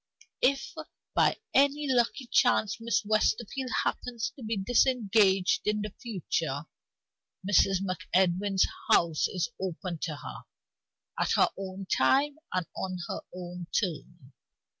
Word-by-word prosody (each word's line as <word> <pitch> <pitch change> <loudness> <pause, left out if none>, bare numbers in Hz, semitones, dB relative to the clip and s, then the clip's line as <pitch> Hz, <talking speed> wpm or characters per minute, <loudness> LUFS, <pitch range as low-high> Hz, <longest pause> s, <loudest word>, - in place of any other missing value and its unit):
If, 275 +9 +1 0.4
by - - +3 0.2
any 285 +2 +3
lucky 250 0 +1
chance, 240 -4 +2
Miss 230 -1 0
Westerfield 235 +4 0
happens 240 -2 -2
to 265 - -11
be 220 -1 -2
disengaged 205 -4 +3
in 210 0 +1
the 210 - -5
future, 165 - -2 0.8
Mrs. 195 -1 +3
MacEdwin's 185 +1 +1 0.2
house 165 -3 +3
is 185 +6 -2
open 180 -2 -4
to 155 - -2
her 145 - -8 0.8
at - - +1
her - - +4
own 190 0 -6
time, 275 - +2
and 185 -2 -1
on 185 -1 -3
her - - -3
own 180 -1 -7
terms. 165 - -6
195 Hz, 120 wpm, -29 LUFS, 180-240 Hz, 0.8 s, her